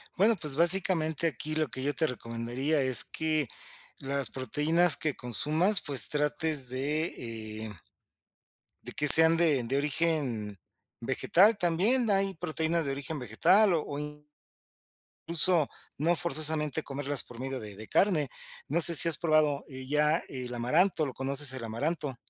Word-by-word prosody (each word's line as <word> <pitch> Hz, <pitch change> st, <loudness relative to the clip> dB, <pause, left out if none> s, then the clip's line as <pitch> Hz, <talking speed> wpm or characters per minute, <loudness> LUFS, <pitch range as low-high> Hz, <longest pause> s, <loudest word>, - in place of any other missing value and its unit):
Bueno, 215 Hz, +5 st, +1 dB
pues, 150 Hz, -4 st, +1 dB
básicamente, 170 Hz, -2 st, +3 dB
aquí 155 Hz, +1 st, -5 dB
lo 155 Hz, -1 st, -2 dB
que 130 Hz, -, -7 dB
yo 145 Hz, +1 st, -2 dB
te 160 Hz, -, -1 dB
recomendaría 120 Hz, +4 st, -4 dB
es 130 Hz, -2 st, +4 dB
que 155 Hz, -3 st, -3 dB, 0.5 s
las 140 Hz, -1 st, -3 dB
proteínas 150 Hz, +6 st, +1 dB
que 155 Hz, -3 st, -3 dB
consumas, 155 Hz, -, 0 dB
pues, 140 Hz, -3 st, +2 dB
trates 150 Hz, -2 st, 0 dB
de 120 Hz, -6 st, -5 dB
eh 105 Hz, -5 st, -12 dB, 1.0 s
de -, -, -5 dB
que 150 Hz, -, +1 dB
sean 160 Hz, +2 st, +10 dB
de 155 Hz, -7 st, 0 dB
de 130 Hz, +4 st, -4 dB
origen 140 Hz, -, -3 dB, 0.4 s
vegetal, 180 Hz, -, +1 dB
también. 205 Hz, +9 st, 0 dB
Hay 195 Hz, -1 st, -1 dB
proteínas 160 Hz, 0 st, -3 dB
de 140 Hz, -, -4 dB
origen 140 Hz, +3 st, -6 dB
vegetal 185 Hz, -, +1 dB
o, 145 Hz, -2 st, -6 dB
in 150 Hz, 0 st, -10 dB, 1.1 s
cluso, 170 Hz, -2 st, +3 dB, 0.3 s
no 165 Hz, +4 st, -1 dB
forzosamente 155 Hz, -2 st, +1 dB
comerlas 140 Hz, 0 st, -5 dB
por 120 Hz, -, -16 dB
medio 135 Hz, +1 st, -7 dB
de 105 Hz, -3 st, -10 dB
de 110 Hz, +2 st, -12 dB
carne. 160 Hz, -9 st, 0 dB, 0.4 s
No 160 Hz, +5 st, -1 dB
sé 170 Hz, 0 st, +7 dB
si 170 Hz, -, +6 dB
has 165 Hz, -, -1 dB
probado, 155 Hz, -3 st, -1 dB
eh, 130 Hz, -2 st, -11 dB
ya, 150 Hz, +3 st, -1 dB
el 125 Hz, -2 st, -8 dB
amaranto, 155 Hz, +8 st, -1 dB
¿lo 135 Hz, -, -8 dB
conoces, 135 Hz, +1 st, +3 dB
el 130 Hz, -3 st, -6 dB
amaranto? 140 Hz, +4 st, -5 dB
150 Hz, 150 wpm, -26 LUFS, 130-165 Hz, 1.1 s, sean